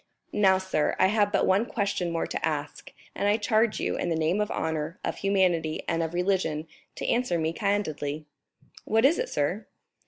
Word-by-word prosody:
"Now, 190 -2 +4
sir, 190 -5 0
I 185 - +4
have 205 -1 +2
but 200 - +2
one 190 +3 +3
question 200 -4 -1
more 165 0 -1
to - - -5
ask, 150 -2 -3 0.2
and 200 - -1
I 205 +1 +3
charge 220 +1 +1
you, - - -1
in 175 - -1
the 165 - +1
name 160 +6 +1
of 210 - -1
honor, 160 +2 -3
of - - -2
humanity, 180 -5 +1
and 165 -1 0
of 165 +1 -3
religion, 175 -4 0 0.3
to - - -5
answer 240 -8 +1
me 160 0 -1
candidly." 155 -7 -2 0.6
"What 225 +3 +2
is 305 +5 +4
it, - - -2
sir?" 175 +9 -1
185 Hz, 190 wpm, -27 LUFS, 160-205 Hz, 0.6 s, Now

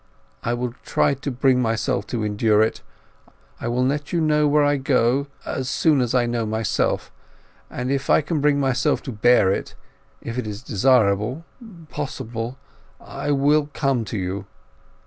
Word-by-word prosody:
I 120 - -1
will 120 0 -3
try - - +2
to 140 +2 -5
bring 130 0 +2
myself 115 +2 -1
to 115 -3 -3
endure 105 +1 +3
it. 110 - -2 0.8
I - - -4
will 125 +2 +1
let 145 +2 -2
you 170 - +1
know 150 -1 +3
where 145 0 +3
I 145 0 +2
go 130 0 +2
to - - -27 0.2
as 130 -1 -3
soon 150 -5 +3
as 120 0 0
I 125 -1 +3
know 120 -1 -1
myself. 110 0 -1 0.6
And 125 +1 -3
if 140 0 -2
I - - +5
can 150 0 -2
bring 145 -1 +3
myself 135 +1 +1
to 135 - -5
bear 110 -3 +4
it—if 115 +4 -7
it 120 - -4
is 105 +2 -6
desirable, 120 - +2 0.5
possible—I 130 0 -7
will 145 +1 +2
come 135 -5 0
to 105 - -4
you. 95 +1 -4
125 Hz, 165 wpm, -22 LUFS, 115-140 Hz, 0.8 s, I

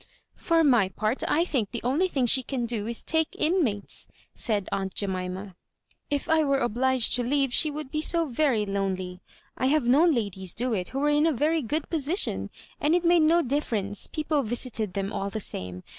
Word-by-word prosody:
" - - -51
For 330 -1 +4
my 240 -10 +4
part, 215 +6 -1
I 335 +3 +2
think 250 - -1
the 235 - -5
only 285 +10 +1
thing 270 -8 0
she 260 +2 +4
can 255 -1 -3
do 225 -3 -2
is 235 0 -4
to - - -41
take 320 0 0
Inmates," 305 - 0 0.3
said 210 -5 0
aunt 190 -1 -3
Jemima. 185 -1 -3 0.3
" - - -40
If 285 -1 -2
I 320 -1 +3
were 275 -2 +2
obliged 255 0 +1
to 245 - +2
leave 270 0 +1
she 310 - +4
would 295 -2 -6
be 305 - -1
so 335 +1 +3
very 255 -5 +1
lone 195 -1 -1
ly. 180 -1 -7 0.4
I 260 - 0
have 295 -1 +2
known 295 +8 +5
ladies 190 -5 -2
do 245 +1 0
it 185 -4 -2
who 265 - -6
were 290 +2 +1
in 295 +2 +3
a - - +3
very 310 +4 +1
good 295 +5 -2
position, 325 +4 0 0.3
and 310 +3 +2
it 355 -1 0
made 340 0 +5
no 335 +2 +4
difference; 220 -7 -2
people 305 -1 -1
visited 225 -4 -3
them 195 0 -2
all 195 - -2
the 220 - -4
same. 90 - -5
255 Hz, 215 wpm, -26 LUFS, 205-305 Hz, 0.4 s, known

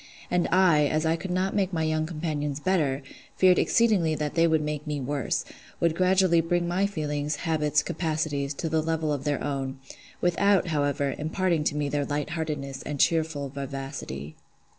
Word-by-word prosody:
And 180 -1 +2
I, 170 -5 +5
as 155 +2 0
I 160 +1 +2
could 185 +3 -6
not 185 +2 0
make 195 -2 +1
my 160 -3 -1
young 155 0 0
companions 150 -3 -3
better, 150 -6 0 0.3
feared 185 -1 +5
exceedingly 200 -9 +3
that 150 -1 -2
they 165 0 +4
would 160 -2 +2
make 150 0 -4
me 150 -1 -2
worse—would 145 +4 -2
gradually 185 -1 +4
bring 175 +1 0
my 185 +3 +1
feelings, 150 -5 -2
habits, 150 -2 +2
capacities, 155 -4 -2
to 165 - -3
the 160 0 +1
level 160 -1 -1
of 140 -1 -4
their 145 -1 0
own; 135 -2 -3 0.4
without, 185 +1 +2
however, 145 -2 0
imparting 165 +1 0
to 150 - +1
me 150 -1 0
their 145 0 0
lightheartedness 145 -1 -3
and 145 -2 -5
cheerful 155 -3 +1
vivacity. 135 - -6
155 Hz, 165 wpm, -27 LUFS, 145-170 Hz, 0.4 s, I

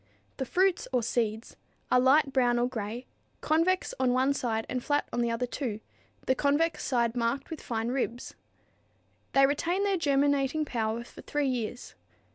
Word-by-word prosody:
The 265 - -3
fruits 375 +3 +2
or 250 -2 +1
"seeds" 220 -1 -2 0.4
are 250 - +6
light 270 +2 +4
brown 245 -2 +3
or 240 +1 +2
gray, 235 0 -5 0.4
convex 330 +4 +1
on 255 -1 +2
one 260 +2 +2
side 225 -5 -2
and 255 -1 -3
flat 290 0 0
on 240 - 0
the 235 - +1
other 230 +2 -1
two, 240 -4 -4 0.5
the 260 - +3
convex 290 +5 +1
side 235 -2 +1
marked 245 +5 -1
with 320 - -6
fine 225 0 -2
ribs. 245 -1 -3 1.0
They 275 0 +6
retain 335 +7 0
their 400 -2 +1
germinating 285 -1 +1
power 230 -3 -2
for - - -13
three 295 -1 -1
years. 245 -1 -4
255 Hz, 165 wpm, -29 LUFS, 235-285 Hz, 1.0 s, are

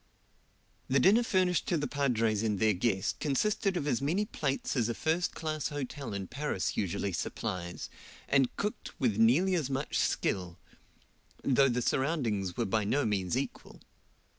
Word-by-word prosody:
The 135 +1 +3
dinner 200 - +6
furnished 185 -6 +1
to 175 - +2
the 145 - -1
padres 115 -8 +1
and 105 -3 0
their 110 -1 +4
guest 95 +1 0
consisted 190 +6 +1
of 145 - -2
as 135 -4 0
many 175 +9 +1
plats 140 -9 -2
as 120 -3 +1
a 115 - -2
first 165 +3 0
class 155 -2 -2
hotel 145 -3 -5
in 100 -1 -3
Paris 130 -2 -2
usually 100 0 -1
supplies, 85 +1 -4 0.4
and 135 -2 +2
cooked 210 +1 -4
with 115 -6 +1
nearly 145 +12 +4
as 155 -7 0
much 135 +2 -1
skill, 90 -2 -1 0.9
though 135 0 +4
the 125 0 0
surroundings 115 - 0
were 120 - +1
by 110 +1 +1
no 135 +8 +1
means 95 -5 0
equal. - - -5
130 Hz, 160 wpm, -31 LUFS, 105-150 Hz, 0.9 s, dinner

